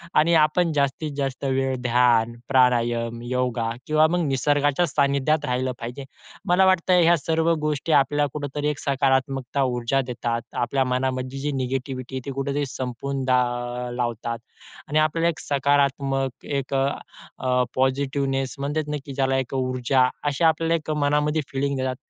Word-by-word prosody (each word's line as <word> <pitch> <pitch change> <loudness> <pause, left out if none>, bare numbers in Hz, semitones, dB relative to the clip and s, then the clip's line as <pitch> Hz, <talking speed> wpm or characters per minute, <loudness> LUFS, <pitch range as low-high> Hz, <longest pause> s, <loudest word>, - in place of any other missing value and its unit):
आणि 160 +3 +4
आपण 160 +2 +2
जास्तीत 145 +2 0
जास्त 135 -2 -3
वेळ 135 0 0
ध्यान, 120 -1 +3
प्राणायाम, 120 -3 +2
योगा 125 -2 -1 0.2
किंवा 155 0 +4
मग 175 +2 0
निसर्गाच्या 145 +4 +2
सानिध्यात 140 +2 +1
राहिलं 130 -1 -1
पाहिजे. 120 +4 -6 0.5
मला 185 +2 +5
वाटतंय, 185 -1 +4
ह्या 170 +1 +5
सर्व 165 +2 +1
गोष्टी 150 +1 -1
आपल्याला 145 0 +3
कुठेतरी 145 0 -3
एक 150 - -3
सकारात्मकता 135 -1 0
ऊर्जा 125 +1 0
देतात. 115 0 -2
आपल्या 135 +2 0
मनामधली 130 +1 -2
जी 145 +2 -2
निगेटिव्हिटी 130 -1 -3
आहे, 130 - -3
ती 140 - -4
कुठेतरी 140 +2 -2
संपून 130 +1 -4
दा 130 -1 +4 0.5
लावतात 120 -1 -2 0.5
आणि 155 +1 +1
आपल्याला 165 +2 +2
एक 165 - -4
सकारात्मक, 140 -2 0
एक 140 -1 -3
अ, 135 0 +2 0.5
अ, 125 -1 +1
पॉझिटिव्हनेस, 135 0 0
म्हणतात 150 +2 -2
ना 150 - -1
की 140 - -7
ज्याला 135 -1 +1
एक 130 -1 -3
ऊर्जा 130 0 +2 0.2
अशी 145 +2 -1
आपल्याला 165 +1 +3
एक 155 -2 -4
मनामध्ये 150 +1 +1
फीलिंग 140 0 -1
देतात. 130 0 -1
135 Hz, 150 wpm, -24 LUFS, 130-150 Hz, 0.5 s, मला